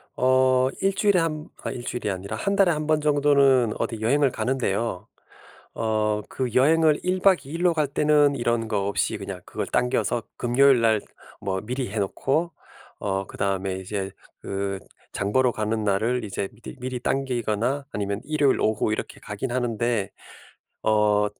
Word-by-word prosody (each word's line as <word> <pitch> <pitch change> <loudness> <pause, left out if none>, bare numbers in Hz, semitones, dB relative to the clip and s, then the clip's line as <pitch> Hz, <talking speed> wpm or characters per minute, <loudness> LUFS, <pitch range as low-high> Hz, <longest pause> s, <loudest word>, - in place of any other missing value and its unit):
어 130 0 +3
1 195 0 +2
주일에 200 -1 +3
한 155 -1 -2 0.2
아 - - -3
1 120 - -7
주일이 115 -4 -2
아니라 100 +3 -5
1 200 - -1
달에 195 -3 +4
1 155 -1 -2
번 155 0 +2
정도는 140 -5 +4
어디 115 -2 -2
여행을 135 +5 +3
가는데요. 115 -6 -1 0.7
어 110 -1 0
그 125 -3 -3
여행을 155 +3 +4
1 185 +1 0
박 190 -2 +4
2 135 - -11
일로 170 +1 +2
갈 155 -3 +1
때는 145 0 +3
이런 120 -2 0
거 100 -3 -1
없이 100 - 0
그냥 95 -2 -7
그걸 - - -4
당겨서 125 -2 0
금요일 125 +1 +4
날 110 -2 +3 0.4
뭐 95 -2 -2
미리 125 +2 -3
해 110 - -2
놓고 140 - 0 0.5
어 95 -1 -2
그다음에 95 -1 -2
이제 95 +1 -4 0.3
그 100 0 -3 0.3
장 100 +1 -2
보러 130 0 +3
가는 110 0 -2
날을 110 +4 +1
이제 100 -1 -3
미리 115 +6 -10
미리 125 0 -4
당기거나 125 0 -1
아니면 100 0 -3
일요일 145 -2 +2
오후 110 0 +1
이렇게 - - -4
가긴 105 +5 -5
하는데 120 -4 0 0.7
어 105 -1 +3
120 Hz, 285 characters per minute, -24 LUFS, 105-140 Hz, 0.7 s, 달에